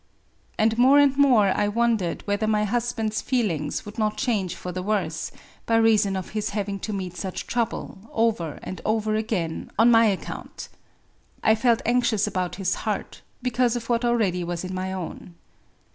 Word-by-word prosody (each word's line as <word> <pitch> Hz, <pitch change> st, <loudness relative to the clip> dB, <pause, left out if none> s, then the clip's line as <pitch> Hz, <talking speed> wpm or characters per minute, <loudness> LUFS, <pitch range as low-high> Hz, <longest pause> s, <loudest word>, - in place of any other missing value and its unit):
And 220 Hz, +1 st, +2 dB
more 265 Hz, +3 st, +6 dB
and 285 Hz, -2 st, +5 dB
more 250 Hz, -8 st, +5 dB
I 205 Hz, -, +1 dB
wondered 220 Hz, -4 st, 0 dB
whether 205 Hz, +1 st, 0 dB
my 210 Hz, -1 st, +2 dB
husband's 225 Hz, 0 st, -1 dB
feelings 170 Hz, -, -1 dB
would 210 Hz, +2 st, -8 dB
not 215 Hz, 0 st, 0 dB
change 210 Hz, -8 st, -1 dB
for 180 Hz, -, -6 dB
the 185 Hz, +1 st, -4 dB
worse, 180 Hz, -6 st, -2 dB, 0.4 s
by 230 Hz, -, +3 dB
reason 220 Hz, -3 st, +4 dB
of 190 Hz, -1 st, -4 dB
his 215 Hz, -1 st, -2 dB
having 200 Hz, -1 st, -2 dB
to 215 Hz, -, -4 dB
meet 185 Hz, -3 st, -4 dB
such 185 Hz, +1 st, -5 dB
trouble, 235 Hz, -4 st, -2 dB
over 215 Hz, -9 st, 0 dB
and 185 Hz, -, -6 dB
over 215 Hz, 0 st, 0 dB
again, 215 Hz, -7 st, -2 dB
on 230 Hz, +3 st, +6 dB
my 230 Hz, 0 st, +6 dB
account. 200 Hz, -4 st, -4 dB, 0.7 s
I 220 Hz, -, +5 dB
felt 230 Hz, +1 st, +2 dB
anxious 235 Hz, -3 st, +2 dB
about 185 Hz, -4 st, -2 dB
his 185 Hz, -1 st, 0 dB
heart, 215 Hz, -2 st, -4 dB, 0.2 s
because 250 Hz, -1 st, +1 dB
of 235 Hz, -1 st, -5 dB
what 235 Hz, 0 st, +1 dB
already 215 Hz, -7 st, +1 dB
was 175 Hz, 0 st, -4 dB
in 185 Hz, 0 st, -5 dB
my 185 Hz, 0 st, -3 dB
own. 180 Hz, -1 st, -7 dB
215 Hz, 175 wpm, -24 LUFS, 185-230 Hz, 0.7 s, more